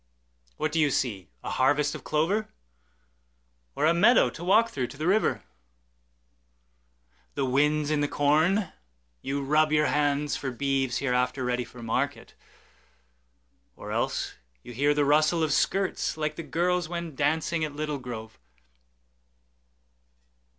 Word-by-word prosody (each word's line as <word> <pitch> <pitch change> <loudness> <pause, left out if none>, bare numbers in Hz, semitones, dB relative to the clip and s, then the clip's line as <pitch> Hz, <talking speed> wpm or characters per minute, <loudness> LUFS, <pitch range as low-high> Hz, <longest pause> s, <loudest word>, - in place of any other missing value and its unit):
What 155 - -1
do 165 - 0
you 150 -2 +4
see, 105 -9 -2
a - - -4
harvest 145 +3 +2
of - - -8
clover? 180 +8 0 1.3
Or - - +1
a 165 - +5
meadow 210 +8 +5
to 165 - -9
walk 220 +6 +4
through 130 -3 -2
to 140 - -12
the 155 - -3
river? 200 +5 +1 1.9
The 140 - 0
wind's 150 +3 +1
in 150 -1 +1
the 145 - +1
corn; 160 +7 +2 0.5
you 140 +1 -3
rub 155 +2 +2
your 150 0 +3
handsFor 145 -3 -1
beeves 135 -2 0
hereafter 125 0 0
ready 125 0 0
for 120 0 -12
market; 140 +5 -2 1.4
Or - - -8
else - - -1 0.3
you 120 - -10
hear 145 +4 +2
the 145 -1 +2
rustle 155 +3 +3
of 155 - 0
skirtsLike 155 -3 0
the 165 - -5
girls 170 +3 -1
when 170 -2 -5
dancing 160 +3 0
at 150 -2 -4
Little 150 -1 -3
Grove. 110 - -8
150 Hz, 135 wpm, -27 LUFS, 135-160 Hz, 1.9 s, a